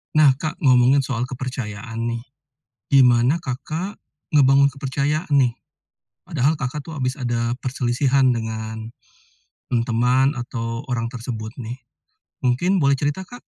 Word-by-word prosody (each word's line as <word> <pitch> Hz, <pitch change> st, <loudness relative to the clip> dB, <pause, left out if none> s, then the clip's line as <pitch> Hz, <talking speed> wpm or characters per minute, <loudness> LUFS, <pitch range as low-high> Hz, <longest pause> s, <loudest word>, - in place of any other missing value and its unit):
Nah, 145 Hz, -4 st, +6 dB
Kak, 155 Hz, +5 st, -5 dB
ngomongin 130 Hz, -2 st, +5 dB
soal 130 Hz, -3 st, -1 dB
kepercayaan 120 Hz, -4 st, -5 dB
nih, 115 Hz, 0 st, -2 dB, 0.7 s
gimana 125 Hz, +2 st, +5 dB
Kakak, 160 Hz, +7 st, -4 dB, 0.4 s
ngebangun 140 Hz, 0 st, +6 dB
kepercayaan 140 Hz, +4 st, -2 dB
nih, 130 Hz, -4 st, +3 dB, 0.7 s
padahal 155 Hz, -3 st, +1 dB
Kakak 135 Hz, 0 st, -3 dB
tuh 160 Hz, -, -7 dB
habis 130 Hz, 0 st, -2 dB
ada 120 Hz, -2 st, -1 dB
perselisihan 130 Hz, +1 st, +2 dB
dengan, 110 Hz, -1 st, -4 dB, 0.8 s
mmm, 120 Hz, -2 st, +1 dB
teman, 125 Hz, +4 st, +2 dB
atau 115 Hz, -1 st, -4 dB
orang 115 Hz, -2 st, -2 dB
tersebut 115 Hz, -3 st, -5 dB
nih, 120 Hz, 0 st, -5 dB, 0.7 s
mungkin 130 Hz, +10 st, +2 dB
boleh 140 Hz, -1 st, +3 dB
cerita, 145 Hz, +6 st, -1 dB
Kak? 245 Hz, +7 st, -12 dB
130 Hz, 125 wpm, -22 LUFS, 120-140 Hz, 0.8 s, Nah